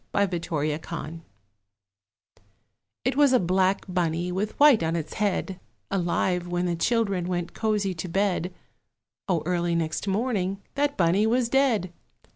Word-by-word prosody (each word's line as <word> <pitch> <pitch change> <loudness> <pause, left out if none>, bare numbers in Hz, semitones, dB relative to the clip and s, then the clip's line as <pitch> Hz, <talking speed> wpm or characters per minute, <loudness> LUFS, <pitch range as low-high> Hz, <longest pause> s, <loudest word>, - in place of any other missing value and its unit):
BLACK 200 -2 +2 0.5
BUNNY 165 -1 -6 1.8
It 255 +1 +1
was 285 -2 +5
a 255 - +5
black 185 +2 +1
Bunny, 175 -1 -1
with 200 +4 -3
white 285 -6 +7
in 165 0 0
its 155 -2 -4
head, 195 -2 -1 0.3
Alive 180 -1 0
when 175 0 -1
the 175 -1 0
children 200 -1 0
went 175 -1 -3
cosy 210 -3 0
to 175 +1 -6
bed 190 -1 0 0.8
O 170 -4 +1
early 175 -1 0
next 160 +3 -2
morning 195 -2 -1
that 285 0 0
Bunny 185 +5 +3
was 240 +1 +1
dead! 240 -9 +2
185 Hz, 135 wpm, -26 LUFS, 175-215 Hz, 1.8 s, white